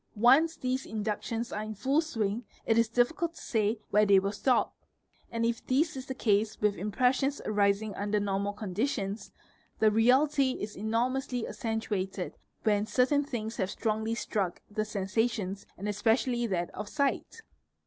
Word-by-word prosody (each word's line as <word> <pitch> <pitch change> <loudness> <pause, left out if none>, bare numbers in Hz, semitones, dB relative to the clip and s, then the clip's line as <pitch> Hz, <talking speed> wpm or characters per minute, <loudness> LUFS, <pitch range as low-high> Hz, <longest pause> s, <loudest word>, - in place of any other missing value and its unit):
Once 270 +9 +5
these 255 +1 -1
inductions 220 +2 -3
are 210 - -2
'in 215 0 -5
full 270 +9 +2
swing, 225 -7 -2 0.2
it 225 - +3
is 230 -1 +3
difficult 320 +8 +1
to - - -11
say 220 -1 0
where 210 +1 +5
they 200 -2 +6
will 195 +1 +1
stop; 250 +5 +1 0.6
and 230 0 -1
if 230 0 -1
this 305 +4 +2
is 265 0 -7
the 265 - -4
ae - - -26
Ve - - -12
Case 215 0 +2
with 210 -1 +2
impressions 255 +8 +1
arising 205 0 +1
under 205 +1 -1
normal 200 0 -1
conditions, 205 +1 -3 0.5
the 220 -1 +4
reality 260 +4 +4
is: 210 -3 -5
5: 205 - -6
BP 230 +3 +1
riously 260 -3 -2
accentuated 205 -5 -3 0.3
when 210 -1 +2
certain 255 +6 +3
things 230 -5 -4
have 190 -3 0
strongly 220 +1 -1
struck 195 -6 -2
the 215 - -1
er 210 -2 -3
isations 200 -2 -1
and 200 - -5
especially 235 +3 +1
that 175 -4 -1
of 210 -1 -6
sight. 280 +9 -1
220 Hz, 170 wpm, -30 LUFS, 205-255 Hz, 0.6 s, they